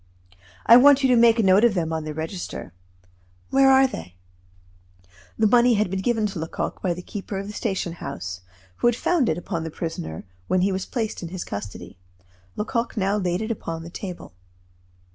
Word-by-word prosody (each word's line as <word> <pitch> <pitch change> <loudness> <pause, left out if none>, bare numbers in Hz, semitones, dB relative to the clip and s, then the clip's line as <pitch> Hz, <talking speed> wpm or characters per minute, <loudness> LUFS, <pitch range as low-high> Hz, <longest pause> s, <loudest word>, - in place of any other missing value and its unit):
I 235 - +9
want 280 +1 +6
you 265 - +4
to 250 - +5
make 230 -1 +5
a 225 - +2
note 190 +2 +5
of 235 -4 +4
them 165 -2 -1
on 160 -1 -3
the 155 - -4
register. 160 - -6 0.8
Where 270 0 +5
are 265 0 +6
they?" 90 - -6 1.2
The - - +2
money 240 +2 +5
had 210 -3 0
been 190 0 -2
given 225 0 +1
to 195 -4 -4
Lecoq 160 +1 -4
by 180 -3 0
the 180 - -8
keeper 195 0 -6
of 195 - -4
the 210 - -7
station 190 -6 -2
house, 90 - -6 0.4
who - - +2
had 240 - +3
found 310 0 +1
it 160 - 0
upon 175 -2 -4
the 160 - -4
prisoner 150 - -5 0.2
when 185 - +2
he 195 +2 +2
was 190 0 -3
placed 225 -4 -3
in 170 - -6
his 180 0 -5
custody. 100 -2 -8 0.6
Lecoq 230 +2 -2
now 195 0 +1
laid 180 0 -1
it 220 - -3
upon 165 -6 -5
the 170 - -10
table. 180 - -8
195 Hz, 200 wpm, -24 LUFS, 165-230 Hz, 1.2 s, I